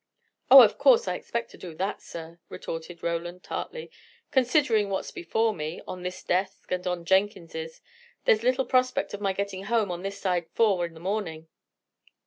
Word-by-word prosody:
"Oh, - - +12
of - - +2
course 480 -1 +5
I - - 0
expect 235 0 -4
to - - -14
do 170 -3 -8
that, 190 +5 -3
sir," 165 0 -9
retorted 165 +1 -7
Roland, 175 +2 -3
tartly. 480 -1 -6 0.4
"Considering 250 -5 +3
what's 190 - -3
before 220 +6 0
me, 155 -1 -5
on 185 -1 -6
this 180 +1 -6
desk 185 +2 -2
and 180 0 -2
on 175 -1 -2
Jenkins's, 170 -4 0 0.4
there's 215 - +4
little 255 +2 +2
prospect 255 -3 +1
of 205 - -6
my 195 -1 +1
getting 195 0 -4
home 215 -3 +1
on 175 0 -4
this 195 +1 -5
side 180 -3 -1
four 195 -6 +3
in 165 - -16
the - - -11
morning. 165 -4 -3
190 Hz, 175 wpm, -27 LUFS, 170-215 Hz, 0.4 s, Oh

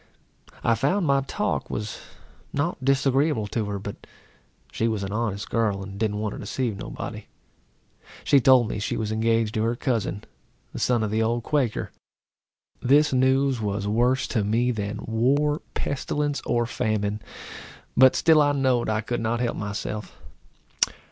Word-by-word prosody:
I 115 - +4
found 145 - +1
my 140 -2 +3
talk 135 - -2
was 105 0 -4 0.5
not 145 -1 -2
disagreeable 135 -2 +2
to 110 +1 -2
her; 100 0 -3
but 100 +1 -8 0.6
she 115 - 0
was 110 -3 -1
an 95 - -4
honest 105 -2 -2
girl, 105 -4 0
and 100 0 -8
didn't 105 -2 0
want 105 -1 -2
to - - -7
deceive 125 -5 -2
nobody. - - -6 1.0
She 140 - +5
told 130 -2 +5
me 105 - -3
she 105 - -2
was 110 -1 -2
engaged 115 0 +1
to 110 - 0
her 115 +1 +1
cousin, 110 -5 -2 0.5
a - - -5
son 120 -3 +2
of 105 - -2
the 110 +1 +1
old 115 +1 0
Quaker. 135 -6 -1 0.9
This 145 +3 +4
news 130 -1 +2
was 100 -1 -2
worse 125 +5 +2
to 110 -4 0
me 115 +4 +1
than 105 -3 -4
war, 140 +7 +1
pestilence, 145 +1 -2
or 120 0 +1
famine; 110 -3 -1 0.7
but 130 0 +7
still 160 -2 +5
I 145 -1 +3
knowed 130 -4 +1
I 110 0 +1
could 120 +2 -3
not 115 +1 0
help 120 -1 -1
myself. 105 -2 -5
115 Hz, 160 wpm, -25 LUFS, 105-130 Hz, 1.0 s, but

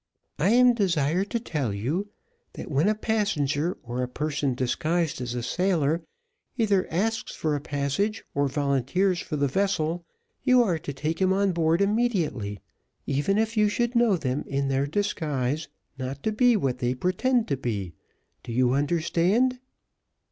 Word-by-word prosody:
"I 170 +6 +3
am 245 +2 +6
desired 180 -3 +1
to 235 - -1
tell 150 - -2
you, 145 - -2 0.4
that - - -8
when 150 +8 +3
a 215 - +2
passenger, 180 -8 0
or 120 +1 -3
a 125 - -1
person 145 0 -2
disguised 155 +4 -1
as 120 -1 -4
a 120 - -3
sailor, 170 0 +1 0.6
either 205 -5 +2
asks 220 +7 -1
for 155 -2 -1
a 145 - -3
passage, 145 +9 -1
or 140 0 +1
volunteers 145 +7 +1
for 155 - -4
the 140 -1 +1
vessel, 170 0 0 0.4
you 255 -1 +5
are 175 -7 0
to 145 - -5
take 155 +5 -3
him 190 0 +3
on 195 0 +2
board 165 +1 +2
immediately, 190 - 0 0.5
even 145 +9 +1
if 220 +1 0
you 210 -1 +4
should 240 +3 0
know 235 -5 +4
them 130 -2 -2
in 140 0 -1
their 135 +1 +1
disguise 150 -6 -1 0.3
not 130 +2 -5
to 220 - +1
be 245 +2 +4
what 130 -8 -1
they 125 +1 0
pretend 220 - +1
to 140 - +2
be 105 -9 -3 0.5
do - - -8
you 125 +1 +2
understand?" 175 - +1
165 Hz, 160 wpm, -26 LUFS, 140-205 Hz, 0.6 s, am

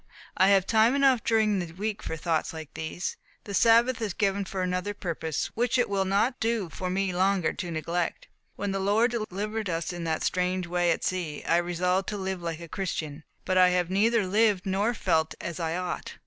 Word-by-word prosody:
I 190 - +4
have 195 -2 +4
time 225 +4 +4
enough 270 -4 +4
during 215 -3 +2
the 170 -2 -5
week 205 +3 -3
for 160 - -4
thoughts 160 0 -1
like 160 -2 -8
these. 160 +3 -4 0.3
The 200 - -7
Sabbath 235 +4 +4
is 210 -5 -2
given 200 -1 0
for 190 -1 -3
another 180 +3 -2
purpose, 165 -5 -3
which 240 +2 +1
it 245 - +2
will 195 -1 0
not 205 +7 +1
do 225 -5 0
for 185 +2 -4
me 190 0 0
longer 185 -1 +2
to 175 - -5
neglect. 170 +2 -2 0.3
When 205 -1 -3
the 195 - -1
Lord 210 +5 +2
delivered 215 -1 -3
us 165 +1 -2
in 175 -1 -5
that 160 -1 -1
strange 180 0 0
way 175 0 +1
at - - 0
sea, 175 -5 -2
I 170 - +2
resolved 180 +2 0
to 210 - -3
live 190 -2 -3
like 165 -1 -4
a 170 - -8
Christian, 160 -4 -4 0.2
but 185 0 +2
I 180 0 +7
have 180 -1 0
neither 215 +2 +3
lived 205 0 +2
nor 200 +5 0
felt 160 -6 +1
as 170 0 -5
I 165 0 -1
ought. 180 0 -4
185 Hz, 205 wpm, -27 LUFS, 175-210 Hz, 0.3 s, I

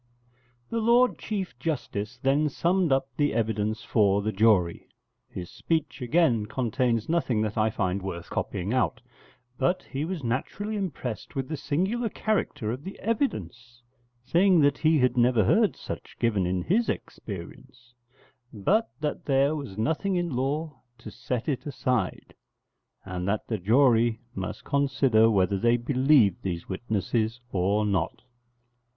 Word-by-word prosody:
] 120 -1 -38
The 230 - 0
Lord 240 +3 +4
Chief 195 -4 -3
Justice 120 -6 -3
then 145 +3 +3
summed 175 +3 +1
up 135 0 +2
the 145 -1 +1
evidence 110 -1 -1
for 100 -2 +2
the 110 - 0
jury. 95 -5 +2 0.4
His 90 -1 -7
speech, 160 -4 -2
again, 125 -5 +2
contains 120 -2 0
nothing 135 -10 +1
that 110 -1 -3
I 110 -1 +2
find 95 -1 -1
worth 85 -3 -6
copying 95 +6 -2
out: 130 -3 +1 0.6
but 175 +8 +1
he 135 +2 -4
was 170 -2 -4
naturally 190 - -2
impressed 140 - -4
with 135 -1 -2
the 160 - -2
singular 190 - -1
character 200 - -1
of 130 +4 -5
the 190 - -8
evidence, 120 - -3 0.4
saying 180 +1 +4
that 145 -1 +3
he 160 0 +4
had 125 -2 +2
never 120 -2 +4
heard - - +3
such - - -8
given 105 -6 +1
in 90 0 -1
his 225 +6 +1
experience; 125 +6 -7 0.6
but 205 - +1
that 150 -1 -3
there 140 +2 +2
was 140 -10 -7
nothing 160 - 0
in 175 -6 -1
law 140 +2 -2 0.2
to 110 - -10
set 115 +2 -4
it 145 -1 -2
aside, 125 -2 -2 0.7
and 90 -1 -4
that 105 +1 -1
the 110 -3 -3
jury 115 +2 +3
must - - -5
consider 135 -5 +3
whether 95 -2 +2
they 120 +3 +3
believed 130 - +3
these 85 -3 -4
witnesses 110 +3 -1
or 100 +3 +1
not. 95 -5 -1
125 Hz, 145 wpm, -27 LUFS, 110-150 Hz, 0.7 s, Lord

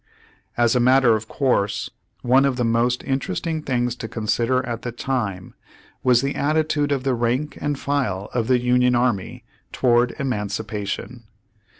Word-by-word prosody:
As 120 0 +3
a - - +3
matter 125 -1 +5
of 110 0 -4
course 110 -8 0 0.3
one 130 +2 +4
of 135 -2 +1
the 125 - -1
most 115 +2 +1
interest 135 -9 -2
ing 160 -2 -2
things 125 -4 -1
to 115 - -5
consider 120 +3 0
at 120 -1 -4
the 120 - -4
time 105 -7 -3 0.5
was 125 0 +3
the 140 - -1
attitude 150 0 0
of 135 -2 0
the 135 -1 +1
rank 125 +5 -1
and 145 -1 -1
file 125 -10 -2
of 115 -2 -1
the 130 -1 +4
Union 125 0 +2
Army 120 -6 -1 0.3
toward 120 -1 +2
emancipation. 110 -2 -4
125 Hz, 160 wpm, -22 LUFS, 115-135 Hz, 0.5 s, matter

